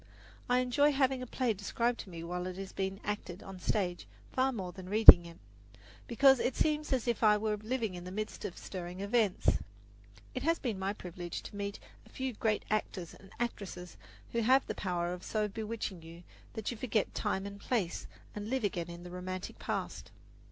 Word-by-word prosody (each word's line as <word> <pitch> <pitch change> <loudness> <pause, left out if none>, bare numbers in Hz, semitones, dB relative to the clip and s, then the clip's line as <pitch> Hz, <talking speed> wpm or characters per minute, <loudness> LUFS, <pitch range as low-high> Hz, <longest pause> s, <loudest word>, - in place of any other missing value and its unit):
I 250 0 +4
enjoy 285 +4 +3
having 265 -2 +2
a 255 - -5
play 245 -1 0
described 235 +4 -1
to 195 - -7
me 165 -2 -7
while 180 +1 -3
it 185 0 -6
is 195 0 -6
being 195 0 -2
acted 205 -3 -4
on 195 -1 -8
the 180 - -14
stage 180 - -1 0.2
far 260 +1 +2
more 190 -7 -4
than 185 0 -10
reading 200 -5 +11
it, 170 - -12 0.7
because 265 +2 +6
then - - +2
it 250 - -4
seems 300 -1 +1
as 255 -3 +1
if 235 -2 0
I 210 -2 +6
were 215 0 0
living 220 -1 -2
in 175 -1 -7
the 180 - -7
midst 215 +2 -4
of 180 - -5
stirring 180 0 -6
events. 205 -1 +2 0.7
It - - -3
has 330 +1 +2
been 225 -7 -3
my 190 +1 0
privilege 175 -3 -6
to - - -9
meet 200 0 -3 0.3
a - - -19
few 260 -1 -3
great 215 0 0
actors 190 -5 -2
and 195 - -15
actresses 195 -7 -4 0.4
who 235 - 0
have 260 +4 +5
the - - -3
power 175 -2 -1
of 180 - -7
so 215 +2 -1
bewitching 215 -3 -4
you 165 +2 -12 0.3
that 220 +1 -3
you 240 - -6
forget 220 -2 0
time 190 +1 -1
and 200 0 -7
place 200 -7 -1 0.3
and 210 +1 -5
live 260 -1 0
again 175 -4 -1
in 170 0 -8
the 180 - -9
romantic 185 +1 -5
past. - - -4
205 Hz, 205 wpm, -32 LUFS, 180-235 Hz, 0.7 s, reading